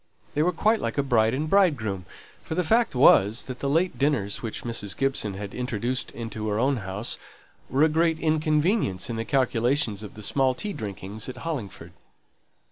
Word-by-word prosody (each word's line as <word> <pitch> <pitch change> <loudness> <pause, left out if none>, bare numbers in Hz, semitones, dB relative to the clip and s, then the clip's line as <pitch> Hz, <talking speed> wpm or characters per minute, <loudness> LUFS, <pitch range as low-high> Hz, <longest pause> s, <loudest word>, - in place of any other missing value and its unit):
They 150 - +1
were 175 +3 +3
quite 215 +6 +2
like - - -2
bride 115 -1 +3
and 150 +3 -2
bridegroom; 130 - +2 0.4
for 160 - -5
the 180 - +1
fact 225 - +2
was, 110 -4 +5
that 130 -1 -7
the 140 - -1
late 170 +5 +1
dinners 135 -9 0
which 115 -2 -5
Mrs. 115 -4 -2
Gibson 135 -7 0
had 100 0 -6
introduced 125 0 -2
into 110 -2 -5
her 105 - 0
own 130 +3 +2
house, 100 +1 -3 0.5
were 135 +4 +3
a - - +7
great 160 +1 +2
inconvenience 155 - +1
in - - -3
the 115 0 -3
calculations 120 -2 +1
of 105 - -9
the 105 - -8
small 130 +3 +2
tea 205 +8 -4
drinkings 105 - -6
at 130 - -7
Hollingford. 105 - -5
125 Hz, 180 wpm, -26 LUFS, 110-155 Hz, 0.5 s, a